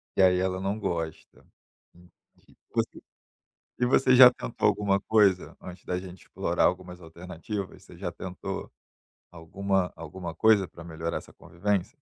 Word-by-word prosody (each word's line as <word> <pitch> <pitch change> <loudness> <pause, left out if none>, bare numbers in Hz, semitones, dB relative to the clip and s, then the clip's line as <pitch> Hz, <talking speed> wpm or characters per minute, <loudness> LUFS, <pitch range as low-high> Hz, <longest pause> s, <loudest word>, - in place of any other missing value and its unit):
e - - +3
aí 90 -1 +5
ela 95 0 -1
não 100 +2 -1
gosta, 80 -5 -4 0.5
entendi. 90 0 -24 0.2
Você - - -1 0.8
e 125 - +3
você 130 +1 +4
já 125 -1 +10
tentou 125 - -1
alguma 100 -1 +2
coisa 100 -4 +2
antes 90 0 -10
da 90 - -2
gente 90 -1 -11
explorar - - -1
algumas 90 0 -2
alternativas, 90 +3 -7
você 90 - -15
já 90 -1 -4
tentou 95 -1 -6 0.6
alguma 95 +3 -1
alguma 85 +2 -7
coisa 100 0 +4
pra 85 - -12
melhorar 80 0 -4
essa - - -14
convivência? 95 +1 -2
90 Hz, 145 wpm, -27 LUFS, 85-100 Hz, 0.8 s, já